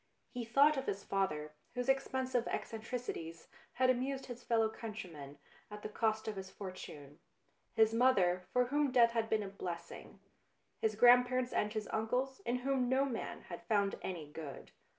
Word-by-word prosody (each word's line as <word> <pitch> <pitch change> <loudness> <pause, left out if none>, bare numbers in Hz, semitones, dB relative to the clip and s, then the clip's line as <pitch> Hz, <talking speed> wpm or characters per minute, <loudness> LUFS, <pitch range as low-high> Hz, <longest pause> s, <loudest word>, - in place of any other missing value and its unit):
He 245 -1 -4
thought 280 +6 +5
of 270 - -3
his 200 0 -2
father, 150 -6 -1 0.2
whose 250 0 -2
expensive 260 -2 +1
eccen 225 -1 -4
tricities 190 -9 -5 0.3
had 255 0 +4
amused 265 +2 -2
his 245 -1 -8
fellow 225 -1 +3
countrymen 180 -11 -8 0.3
at 210 0 -9
the - - -4
cost 220 0 0
of 215 -2 -3
his 190 0 -6
fortune; 165 -7 -9 0.6
his 220 0 +5
mother, 190 -7 +3
for 250 0 +3
whom 285 +2 +1
death 235 -2 +6
had 225 -1 0
been 215 -1 +2
a - - -5
blessing; 175 -3 -7 0.6
his 220 -1 +1
grandparents 245 +2 +5
and 210 0 0
his 215 -1 -3
uncles, 250 - 0
in 240 - +2
whom 265 -3 +2
no 265 +2 +3
man 245 -5 -4
had 175 - -8
found 200 -2 +2
any 175 -5 -4
good. 150 -2 -8
225 Hz, 170 wpm, -35 LUFS, 190-250 Hz, 0.6 s, death